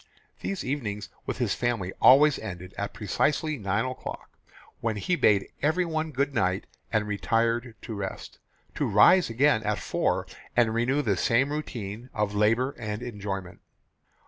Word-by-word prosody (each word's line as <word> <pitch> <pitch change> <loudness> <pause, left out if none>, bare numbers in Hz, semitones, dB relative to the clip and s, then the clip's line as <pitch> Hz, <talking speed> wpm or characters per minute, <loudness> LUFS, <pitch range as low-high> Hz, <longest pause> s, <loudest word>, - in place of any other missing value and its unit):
These 195 - -3
evenings 105 -7 -3 0.2
with - - -2
his 120 -6 0
family 115 -7 -1
always 145 +3 +7
ended 90 -3 -7
at 100 - -3
precisely 145 - 0
nine 100 +3 0
o'clock, 130 0 -6 0.5
when 115 -2 -1
he 140 - 0
bade 100 - +3
everyone 160 0 0
good 140 0 -1
night 95 -3 0 0.3
and 105 -2 +1
retired 115 +3 0
to 115 - -6
rest, 100 -2 -6 0.3
to - - -1
rise 185 -6 +6
again 120 0 +3
at 105 -1 -1
four - - 0 0.3
and 115 -2 +3
renew 130 +6 +1
the 100 -7 +1
same 125 +8 +2
routine 120 -6 -5
of 105 -1 0
labour 115 +6 +2
and 105 0 -4
enjoyment. 100 -6 -5
115 Hz, 145 wpm, -27 LUFS, 105-135 Hz, 0.5 s, always